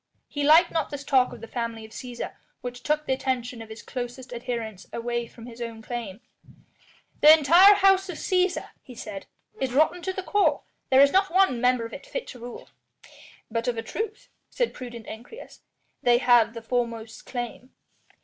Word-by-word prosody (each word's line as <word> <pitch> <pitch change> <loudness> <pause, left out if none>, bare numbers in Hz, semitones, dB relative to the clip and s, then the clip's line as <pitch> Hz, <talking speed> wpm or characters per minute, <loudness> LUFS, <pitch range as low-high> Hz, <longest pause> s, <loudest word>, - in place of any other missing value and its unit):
He 290 - -4
liked 320 +4 +6
not 320 -2 -1
this 285 -1 -6
talk 260 -3 +3
of 240 - -10
the 230 - -8
family 230 -2 -4
of 220 - -15
Cæsar 245 +1 -6 0.3
which 245 0 -6
took 300 +2 0
the 265 - +1
attention 250 -3 -2
of 225 - -10
his 220 +1 -10
closest 250 0 -6
adherents 235 -5 -5
away 235 0 -3
from 230 0 -13
his 240 0 -10
own 230 -1 -6
claim. 230 -3 -6 1.0
"The 300 - +10
entire 340 +6 +8
House 385 -1 +4
of 345 - -5
Cæsar," 365 -1 0
he 250 - -13
said, 205 -3 -7 0.3
"is 265 -2 -1
rotten 315 +5 +3
to 375 - -2
the 380 0 -5
core. 360 -8 +2 0.3
There 265 0 +6
is 280 0 +6
not 390 +1 +3
one 370 -10 +3
member 250 -2 +2
of 230 - -9
it - - -9
fit - - -4
to 250 - -10
rule." 240 +1 -9 0.8
"But 230 +2 -2
of 240 -2 0
a 225 - -3
truth," 435 - -5 0.2
said - - -1
prudent 240 -3 -8
Ancyrus, 240 - -10 0.4
"they 240 -1 +5
have 240 -2 +4
the 230 - -7
foremost 230 -2 -3
claim." 245 0 -5
250 Hz, 190 wpm, -26 LUFS, 235-310 Hz, 1.0 s, The